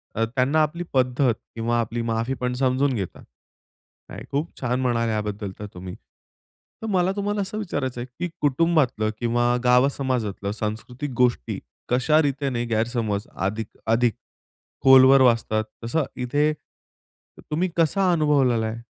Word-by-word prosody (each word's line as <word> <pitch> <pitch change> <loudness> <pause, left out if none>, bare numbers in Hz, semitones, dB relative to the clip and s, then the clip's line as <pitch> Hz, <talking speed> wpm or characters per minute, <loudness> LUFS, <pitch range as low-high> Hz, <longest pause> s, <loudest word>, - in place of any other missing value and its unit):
अ, 115 - +1
त्यांना 140 +4 +3
आपली 170 +3 -2
पद्धत 130 -1 +2 0.2
किंवा 115 +1 0
आपली 115 +1 -2
माफी 115 +3 -1
पण 125 0 0
समजून 130 +1 +2
घेतात. 100 -7 -5 0.9
नाही - - -8
खूप 145 +4 -1
छान 125 0 0
म्हणालात 115 -2 +1
याबद्दल 105 -1 -3
तर 105 - -5
तुम्ही. 90 0 -8 0.9
तर 225 - -4
मला 185 -1 +2
तुम्हाला 205 0 -1
असं 200 +2 -4
विचारायचं 140 - -3
आहे, - - -4
की 175 0 -2
कुटुंबातलं 145 -6 +2
किंवा 120 +1 +1
गाव 125 +2 +5
समाजातलं, 115 -7 -2
सांस्कृतिक 115 +6 -4
गोष्टी 120 - +1 0.3
कशा 130 +6 +3
रीतीने 135 -4 -1
गैरसमज 110 -2 -1
अधिक 105 +3 -2 0.2
अधिक 115 +1 +3 0.7
खोलवर 135 0 +8
वाचतात? 115 -3 +3 0.2
तसं 155 +7 +1
इथे, 145 +5 +1
त 150 - -27
तुम्ही 175 +5 +1
कसा 180 +3 +3
अनुभवलेला 140 -8 +2
आहे? 110 +1 -4
125 Hz, 140 wpm, -24 LUFS, 115-145 Hz, 0.9 s, खोलवर